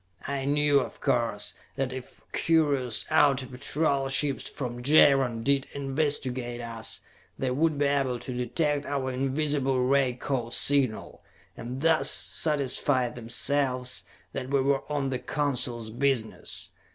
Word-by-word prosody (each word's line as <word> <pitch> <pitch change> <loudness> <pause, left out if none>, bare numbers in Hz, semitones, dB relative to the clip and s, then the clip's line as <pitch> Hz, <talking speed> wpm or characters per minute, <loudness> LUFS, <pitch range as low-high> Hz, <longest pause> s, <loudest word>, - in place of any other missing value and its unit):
I 140 -1 -2
knew, 145 0 +3
of - - -5
course, 120 -6 0 0.2
that 130 -2 -2
if 130 -1 -9
curious 145 -7 +1
outer 140 -2 +4
patrol 135 +2 -1
ships 135 +1 +3
from 120 -3 -5
Jaron 135 -4 +4
did 140 +1 +1
investigate 135 -4 -1
us, 115 -1 -1 0.4
they 130 -1 -1
would 155 +3 +1
be 145 - +2
able 135 -3 +1
to 125 - -6
detect 140 +4 -1
our 135 -2 -2
invisible 135 0 0
ray 135 -1 +2
code 120 -1 -3
signal, 135 -6 +1 0.3
and 125 +3 -6
thus 160 0 +3
satisfy 140 -4 +1
themselves 125 +2 -1 0.3
that 130 - -4
we 140 0 +2
were 135 0 +1
on 140 -2 -1
the 130 - -2
Council's 125 -7 -2
business. 125 -2 -2
135 Hz, 130 wpm, -27 LUFS, 125-145 Hz, 0.4 s, outer